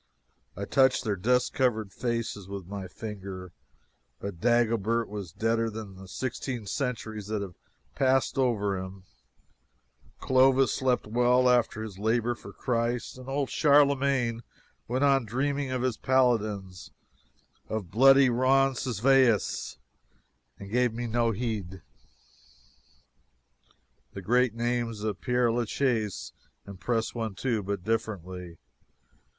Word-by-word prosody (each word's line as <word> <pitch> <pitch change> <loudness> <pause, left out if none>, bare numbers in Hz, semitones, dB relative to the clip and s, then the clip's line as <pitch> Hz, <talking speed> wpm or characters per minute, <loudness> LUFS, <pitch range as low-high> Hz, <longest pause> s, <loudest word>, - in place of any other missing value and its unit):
I 100 - -3
touched 130 +3 +3
their 105 -4 0
dust 125 +6 +1
covered 110 -6 0
faces 115 -5 -3
with 100 -2 -6
my 95 0 -6
finger, 95 -3 -8 0.7
but 100 -4 -7
Dagobert 115 -1 +2
was 100 -5 -7
deader 115 +4 0
than 110 -3 -8
the 95 0 -12
sixteen 120 +2 -4
centuries 110 -3 -3
that 105 -1 -2
have 95 -3 -8 0.4
passed 130 - +2
over 105 -6 +1
him, 95 0 -8 1.2
Clovis 130 +1 +4
slept 130 -2 0
well 125 +3 +3
after 120 -3 +2
his 100 -4 -8
labor 115 +3 +1
for 105 -3 -11
Christ, 120 +3 -2
and 130 +1 -9
old 140 0 -1
Charlemagne 140 -5 +3 0.5
went 130 +4 0
on 135 -2 +4
dreaming 135 +5 -1
of 130 -1 -2
his 125 -4 0
paladins, 110 -9 0 0.8
of 105 -6 -4
bloody 135 +5 +6
Roncesvalles, 130 -2 +2 0.8
and 100 0 -10
gave 125 0 +2
no 120 0 0
heed 110 -4 -3
to 95 - -10
me. - - -19 2.3
The 100 - -6
great 125 +2 +2
names 120 -2 -2
of 105 -3 -3
Pere 125 -2 +2
la 120 +1 0
Chaise 115 -4 -1 0.3
impress 110 +4 -2
one, 110 -4 -4
too, 115 -1 -1
but 100 -1 -4
differently. 95 -6 -3
115 Hz, 125 wpm, -28 LUFS, 100-125 Hz, 2.3 s, bloody